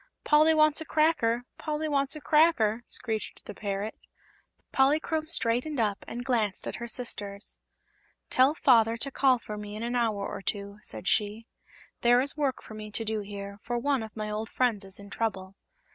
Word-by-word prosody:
"Polly 310 +1 +5
wants 305 0 +4
a - - -5
cracker! 275 -8 +2 0.2
Polly 310 0 -2
wants 280 -1 0
a 305 - -8
cracker!" 280 -10 +3
screeched 220 -2 -5
the - - -7
parrot. 200 +1 -3 0.8
Polychrome 310 +3 +2
straightened 255 -1 +1
up 210 -3 0
and 245 +1 -6
glanced 225 -6 0
at - - -4
her 235 - -5
sisters. 205 -4 -2 0.8
"Tell 265 +4 +4
Father 230 -5 +4
to 275 +4 -2
call 265 -1 +4
for 210 -2 -7
me 210 0 -7
in 215 - -5
an 240 +1 -2
hour 220 -4 0
or - - -6
two," 200 +1 -3
said - - -3
she. 215 +1 0 0.6
"There 240 +1 +5
is 270 +2 +3
work 285 -3 -1
for - - -11
me 215 0 -7
to 225 +2 -3
do 220 0 0
here, 200 0 -7
for 240 +1 -2
one 275 +1 +1
of 220 0 -9
my 215 0 -3
old 215 +1 -3
friends 235 -6 +1
is 190 -1 -8
in 200 0 -12
trouble." 195 -4 -3
230 Hz, 185 wpm, -28 LUFS, 210-275 Hz, 0.8 s, Polly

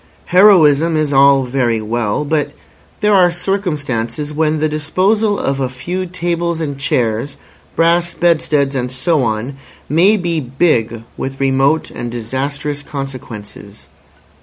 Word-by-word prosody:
Heroism 165 -5 +5
is 150 -2 0
all 135 0 +5
very 125 -3 0
well, 110 +4 -2
but 145 -1 -1 0.5
there 210 0 +3
are 185 -3 +5
circumstances 150 - -3
when 155 0 +1
the 155 +1 +1
disposal 195 +8 0
of 135 0 -2
a 130 -2 -1
few 180 +9 -4
tables 170 -1 -2
and 145 -3 -3
chairs, 125 -1 -1 0.4
brass 170 +1 +2
bedsteads, 150 -5 +1
and 125 -2 -2
so 145 +4 0
on, 115 +3 -2 0.3
may 185 +8 +4
be 170 -4 -1
big 120 -5 0
with 135 0 -5
remote 135 +3 +1
and 120 - -5
disastrous 140 +5 -3
consequences. 115 -8 -9
145 Hz, 130 wpm, -16 LUFS, 130-170 Hz, 0.5 s, Heroism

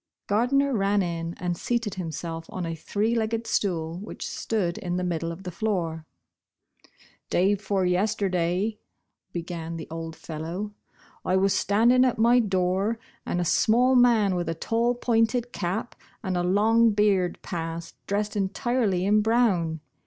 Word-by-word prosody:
Gardner 265 +6 +2
ran 200 -1 +2
in, 170 -1 -3
and 175 -1 -2
seated 230 +1 -1
himself 165 -2 -5
on 185 -2 -4
a 165 - -3
three 205 +8 -1
legged 230 0 -1
stool, 170 -6 -1
which 210 - -7
stood 185 -6 -2
in 175 -1 -3
the 180 - -1
middle 170 -2 -2
of 170 +3 -9
the 180 - -5
floor. 170 -5 -2 0.6
" - - -54 0.5
Day 190 +3 +3
before 195 -1 -1
yesterday," 190 +1 0 0.5
began 170 -1 -5
the 160 - -7
old 165 0 -5
fellow, 170 +7 -5 0.3
" - - -27
I 185 - +1
was 195 +1 +3
standing 235 +5 +4
at 255 -2 +2
my 235 +3 +5
door, 190 +1 +1 0.3
and 175 - -1
a 175 - 0
small 245 +9 +3
man, 235 -5 +5
with 175 -2 -2
a 165 - -2
tall 235 +6 0
pointed 240 0 +1
cap 195 +6 -3 0.3
and 190 -3 -1
a 175 - +1
long 215 +5 +4
beard, 200 -4 +2
passed, 165 -1 -5
dressed 205 +1 -1
entirely 200 -1 0
in 210 +2 +4
brown. 200 -9 +2
195 Hz, 155 wpm, -26 LUFS, 175-225 Hz, 0.6 s, my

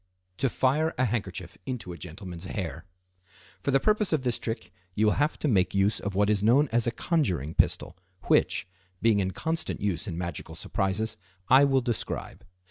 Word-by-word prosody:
To 135 - +1
Fire 150 +7 +1
a 130 - +3
Handkerchief 95 -6 -4
into 125 -8 -4
a - - -9
Gentleman's 90 0 -7
Hair.—For 90 - -8
the 135 0 +4
purpose 210 +5 +2
of 155 -5 +1
this 125 -2 0
trick 105 -6 -4 0.2
you 110 - +3
will 105 - +4
have 145 +2 +1
to - - -1
make 95 -7 +2
use 100 +2 +2
of 100 -2 -4
what 100 +1 +3
is 105 -2 +2
known 130 +7 +5
as 120 0 +2
a - - +2
conjuring 90 - 0
pistol, - - +1 0.3
which, - - +2 0.3
being 110 -2 +3
in 95 -1 +1
constant 160 - -2
use 95 -2 -1
in 85 -4 -4
magical 85 -2 -5
surprises, 100 +6 -1 0.3
I 135 +2 +8
will 135 -1 +3
describe. 120 -3 -4
105 Hz, 180 wpm, -28 LUFS, 90-130 Hz, 0.3 s, I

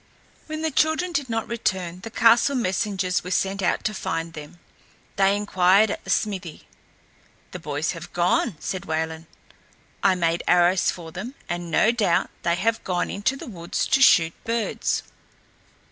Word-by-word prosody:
When 310 0 -5
the 320 - 0
children 315 +5 +1
did 285 -6 -2
not 225 -1 -2
return 185 -6 -2
the 225 - -7
castle 230 +5 +4
messengers 190 -4 0
were 180 - -6
sent 195 +1 0
out 180 - 0
to 215 - -1
find 165 -4 -3
them. 155 +2 -10 0.6
They 195 0 +3
inquired 200 +1 +3
at - - -5
the - - -11
smithy. 190 -5 -2 0.8
"The 180 - -7
boys 150 -1 -2
have 165 - -9
gone," 175 +2 +1
said 185 -2 -4
Wayland. 160 0 -3 0.7
"I 195 -1 +4
made 170 -1 0
arrows 180 +1 +4
for 165 -2 -6
them, 220 - -7
and 175 0 -4
no 215 +7 +4
doubt 215 -8 +1
they 170 0 +1
have 225 +5 0
gone 180 -1 -1
into 205 +7 0
the - - -8
woods 170 -6 -3
to 270 - +2
shoot 165 -9 +6
birds." 230 -1 -1
190 Hz, 160 wpm, -24 LUFS, 170-225 Hz, 0.8 s, shoot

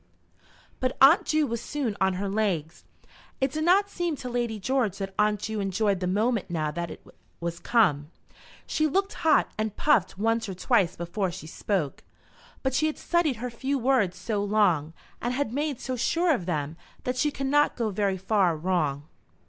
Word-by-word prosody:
But 255 0 -1
Aunt 280 +6 +7
Ju 310 -1 +2
was 235 -3 -3
soon 265 -8 -3
on 190 0 +3
her 195 +2 -3
legs. 195 -6 -2 0.5
It 265 0 +1
did 310 +2 -2
not 380 +4 +4
seem 350 -5 -2
to 255 -2 -6
Lady 240 -3 -2
George 230 -4 0
that 195 -1 -5
Aunt 210 -1 +2
Ju 220 0 -3
enjoyed 195 0 0
the 180 - -2
moment 215 +3 0
now 155 -3 -1
that 170 +2 -4
it - - -11 0.3
was 170 0 -4
come. 150 -11 +2 0.6
She 310 0 +1
looked 390 +6 0
hot, 320 -3 +3
and 215 -1 -1
puffed 190 -11 +2
once 225 +1 0
or 190 - -5
twice 185 -3 +2
before 180 +3 -2
she 175 -2 -8
spoke. 160 -2 -2 0.6
But 265 -1 0
she 310 +4 +2
had 310 - -3
studied 340 -6 +1
her 245 +2 -5
few 270 +4 -2
words 240 -8 +1
so 205 +2 -2
long, 180 -7 +2 0.3
and 245 +1 -1
had 270 -4 -1
made 290 -1 -1
so 255 - -3
sure 335 +7 +2
of 185 -10 -3
them, 155 -2 -2 0.3
that 250 - -1
she 275 +4 +2
could 275 -1 -4
not 290 +2 +3
go 225 -3 -1
very 195 -1 0
far 190 -3 +2
wrong. 155 -5 0
215 Hz, 190 wpm, -27 LUFS, 185-265 Hz, 0.6 s, Aunt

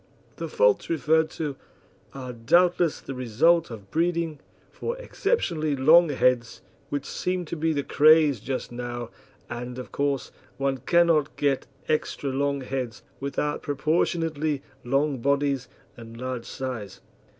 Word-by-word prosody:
The - - -4
faults 470 -1 +2
referred 160 +1 +2
to 150 -4 -2 0.6
are 130 -2 -7
doubtless 170 +7 +3
the 135 - -7
result 140 +8 +3
of 105 -5 -10
breeding 165 -2 0 0.3
for 475 +1 -4
exceptionally 170 - 0
long 160 +5 +6
heads, 125 -3 +1 0.3
which 145 -1 -3
seem 180 -1 -2
to 165 - -5
be 160 0 0
the 145 -2 -1
craze 155 -4 +5
just 130 +4 -4
now, 120 -1 -5 0.4
and, 125 +1 -6
of 125 - -7
course, 140 -1 -1 0.3
one 135 -1 0
cannot 165 +1 +3
get 140 -2 0 0.2
extra 150 -2 -1
long 140 +1 0
heads 130 -2 -4 0.2
without 145 +2 -2
proportionately 155 0 0 0.2
long 135 +2 +1
bodies 140 0 +1 0.3
and 115 0 -11
large 125 -2 -4
size. 120 -7 -5
140 Hz, 130 wpm, -26 LUFS, 125-160 Hz, 0.6 s, long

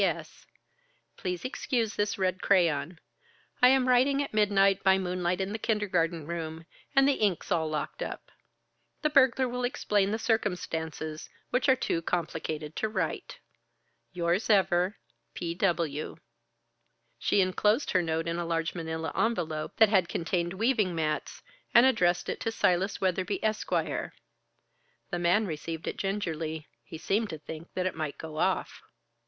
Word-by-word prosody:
"P. - - +5
S. - - -4 0.7
Please 180 +1 -4
excuse 240 -4 -1
this 205 0 -1
red 185 0 0
crayon. 170 -4 +2 0.6
I 250 - +9
am 260 0 +4
writing 265 +3 +4
at 275 - -8
midnight, 200 -2 +3
by 190 0 +5
moonlight 180 -1 -1
in 190 +1 -2
the 220 - -3
kindergarten 180 -8 0
room, 165 0 -5 0.3
and 270 0 +6
the 280 - +1
ink's 200 -1 0
all 160 -3 +1
locked 155 -1 -4
up. - - -6 0.7
The 305 - +2
burglar 265 -2 +4
will 250 0 -3
explain 210 -6 +1
the 215 - 0
circumstances, 160 - -2 0.2
which 255 +3 +2
are 260 - +7
too 170 -9 -1
complicated 160 -2 -3
to 220 - 0
write. 215 - -3 0.7
"Yours 175 +4 0
ever, 190 -1 +3 0.4
"P. 170 -1 -3
W." 170 -5 -1 1.0
She - - +2
enclosed 210 +7 +2
her 185 - +3
note 165 0 -1
in 170 +1 -1
a - - -1
large 165 -1 -1
manila 160 -1 -4
envelope 160 -9 -1
that 220 -2 +6
had 190 -5 +3
contained 175 +1 -1
weaving 210 -3 +1
mats, 155 -2 -2 0.3
and 235 - +9
addressed 180 -9 +2
it - - -3
to 225 - -2
Silas 190 -2 +1
Weatherby, 185 +1 -1
Esq. 215 0 -1
The - - -1 1.1
man 175 +5 +3
received 160 -1 -5
it - - -3
gingerly. 165 -6 -3 0.2
He 160 - -9
seemed 205 +6 0
to 160 - -5
think 160 +2 -9
that 185 - -1
it 185 - 0
might 155 -3 -4
go 155 -1 -7
off. 185 +2 0
185 Hz, 155 wpm, -29 LUFS, 165-215 Hz, 1.1 s, I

